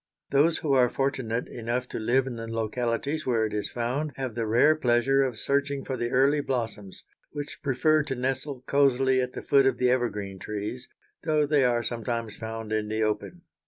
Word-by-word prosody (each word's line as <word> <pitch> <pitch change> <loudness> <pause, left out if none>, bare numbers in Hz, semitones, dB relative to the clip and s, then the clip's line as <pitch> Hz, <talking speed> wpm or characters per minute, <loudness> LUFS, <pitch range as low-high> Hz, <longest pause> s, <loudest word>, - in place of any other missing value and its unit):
Those 150 +4 +4
who 145 -3 0
are 125 -2 +5
fortunate 125 -4 -1
enough 120 +2 -3
to - - -4
live 125 +4 +2
in 125 -3 -5
the 115 0 -6
localities 115 +6 -2
where 115 -3 +2
it 110 - -4
is 105 -1 -2
found 130 +5 -2
have 130 -3 -4
the 115 -1 -2
rare 125 +8 +5
pleasure 130 -1 +2
of 130 -4 -1
searching 140 +3 -1
for 130 - -3
the 120 -1 -2
early 140 +4 +3
blossoms, 115 -7 -4 0.3
which 145 -1 -6
prefer 155 +3 +2
to 135 - -3
nestle 130 +1 -3
cosily 130 -1 +3
at 125 0 -3
the - - -6
foot 135 -1 +4
of 135 - +1
the 125 -1 +3
evergreen 105 -6 -2
trees, 105 +5 -5 0.3
though 155 -2 +2
they 145 -1 +3
are 120 -2 +2
sometimes 115 -2 -1
found 110 -1 -5
in 110 -1 0
the 110 +1 -1
open. 110 +11 -3
125 Hz, 195 wpm, -27 LUFS, 115-140 Hz, 0.3 s, are